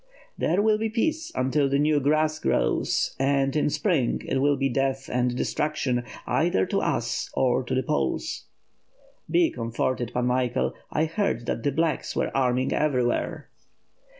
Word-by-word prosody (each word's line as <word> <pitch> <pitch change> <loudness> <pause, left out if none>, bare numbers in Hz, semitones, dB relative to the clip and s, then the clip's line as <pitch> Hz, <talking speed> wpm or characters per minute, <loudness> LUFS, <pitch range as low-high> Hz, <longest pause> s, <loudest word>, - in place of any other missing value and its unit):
"There 185 +5 +1
will 215 -1 +3
be 220 0 -1
peace 315 +8 -1
until 135 +2 +1
the 140 - +2
new 150 +1 +3
grass 155 +2 +1
grows; - - 0
and 135 0 +1
in 150 - +2
spring 150 - 0
it - - -1
will 145 0 +3
be 135 0 +1
death 135 +1 -1
and 125 0 +1
destruction 140 -5 -1
— - - -13
either 125 - +1
to - - -1
us - - -1
or 130 0 +2
the 130 +1 -1
Poles." 150 - -2 0.9
"He 345 -2 +4
comforted, 120 +1 -2
Pan 125 0 -1
Michael, 125 -1 0 0.2
I 155 - +1
heard 160 - -1
that 115 - -2
the 145 - 0
blacks 160 +2 -1
were - - -1
arming 130 -1 +1
everywhere." 125 -5 0
135 Hz, 155 wpm, -25 LUFS, 125-155 Hz, 0.9 s, He